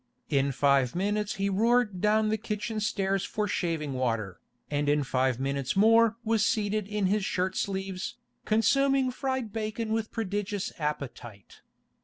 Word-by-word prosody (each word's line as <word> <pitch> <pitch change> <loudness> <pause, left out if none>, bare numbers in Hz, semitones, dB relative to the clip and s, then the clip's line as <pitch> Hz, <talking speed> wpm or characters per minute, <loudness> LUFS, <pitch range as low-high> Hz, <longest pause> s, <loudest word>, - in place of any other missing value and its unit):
In 140 -1 +2
five 135 -1 +2
minutes 205 +3 -1
he 195 0 -1
roared 215 -1 +2
down 215 +1 +3
the 220 - +1
kitchen 215 0 -3
stairs 195 -3 0
for 210 -1 -2
shaving 165 -7 -2
water, 115 -8 -2 0.3
and 145 0 0
in 145 0 +2
five 130 -1 0
minutes 135 0 -1
more 225 +2 +5
was 225 -1 +2
seated 215 -3 0
in 210 -1 -1
his 205 +2 +1
shirt 185 0 -1
sleeves, 190 +2 -3 0.3
consuming 265 +4 +3
fried 260 -4 -3
bacon 220 0 -2
with 225 -1 -1
prodigious 205 -2 -3
appetite. 140 - -5
200 Hz, 145 wpm, -28 LUFS, 150-220 Hz, 0.3 s, more